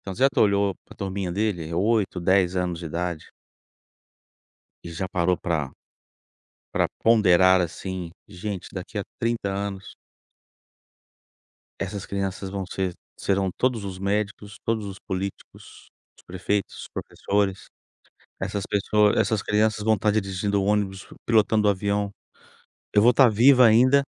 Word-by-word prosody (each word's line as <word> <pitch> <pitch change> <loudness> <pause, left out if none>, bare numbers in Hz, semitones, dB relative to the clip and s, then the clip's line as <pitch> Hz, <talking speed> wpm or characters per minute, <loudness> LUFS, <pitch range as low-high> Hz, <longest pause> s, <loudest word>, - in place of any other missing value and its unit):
Então 95 - -7
você 130 - -3
já 135 - +7
te - - -4
olhou 100 -2 +3
para - - -15
turminha 95 -2 -3
dele, 95 -5 -1
é 85 - -5
8, 100 -1 +1
10 95 0 +3
anos 90 -2 -1
de 85 - -8
idade. 85 0 -4 1.6
E 85 - -7
já 95 +3 -4
parou 90 -2 +1
pra 80 -6 -2 1.0
pra - - +1
ponderar 95 -5 +5
assim, 90 0 -4 0.2
gente 100 -1 -6
daqui 95 +2 -6
a - - -3 0.2
30 115 -3 -1
anos. 100 -1 -5 1.8
Essas 100 +1 -4
crianças 95 -1 -3
vão 95 0 -4
ser, 95 -1 -3 0.2
serão 95 -1 0
todos 125 -5 0
os 95 -1 -6
médicos, 100 +1 -3
todos 110 -2 -1
os 95 -1 -8
políticos, 95 +1 -7 0.3
os - - -21
prefeitos, 95 +2 -2
os - - -9
professores, 100 -1 -2 0.7
essas 100 -1 -3
pess 100 - 0 0.4
essas 110 -3 +1
crianças 105 0 +1
vão 110 0 +3
estar 105 +1 +1
dirigindo 100 -1 0
o - - -1
ônibus, 100 -2 0 0.2
pilotando 110 -2 +3
o - - +6
avião, 100 +1 -1 0.8
eu 105 0 +4
vou 120 - +7
estar 125 0 +6
viva 125 +4 +6
ainda, 130 +5 +5
100 Hz, 145 wpm, -24 LUFS, 95-105 Hz, 1.8 s, já